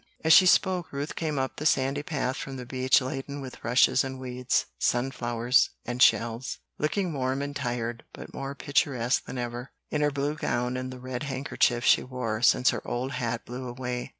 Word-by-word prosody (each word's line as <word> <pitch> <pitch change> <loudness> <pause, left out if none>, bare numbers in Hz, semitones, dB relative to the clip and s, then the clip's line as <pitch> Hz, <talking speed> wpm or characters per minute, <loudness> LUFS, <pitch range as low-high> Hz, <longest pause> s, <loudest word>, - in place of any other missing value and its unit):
As 160 0 +6
she 185 - +8
spoke 180 -1 +3
Ruth 140 +2 -4
came 155 -3 -2
up 130 0 -2
the 150 - -5
sandy 135 0 +1
path 145 -5 -2
from 135 - -6
the 125 - -7
beach 130 +2 +3
laden 135 +2 -5
with 130 -2 -9
rushes 125 +3 +4
and 130 -1 -5
weeds, 125 -1 -1
sun 125 +2 +1
flowers 120 0 +2 0.2
and 120 +1 -4
shells, 115 +1 +3 0.2
looking 170 +3 0
warm 130 0 -1
and 145 0 -5
tired 120 -3 -3
but - - -11
more 135 +1 -5
picturesque 135 -4 +1
than - - -7
ever, 120 +1 -4 0.2
in 150 - 0
her 150 - +3
blue 145 +1 -1
gown 125 -4 -1
and 130 0 -4
the 130 - -8
red 125 0 -5
handkerchief 130 -3 0
she - - +6
wore 120 -4 -3
since 125 +1 +5
her - - -4
old 125 +2 -3
hat 120 -2 -3
blew 125 +1 -6
away. 125 0 -4
130 Hz, 195 wpm, -27 LUFS, 125-140 Hz, 0.2 s, she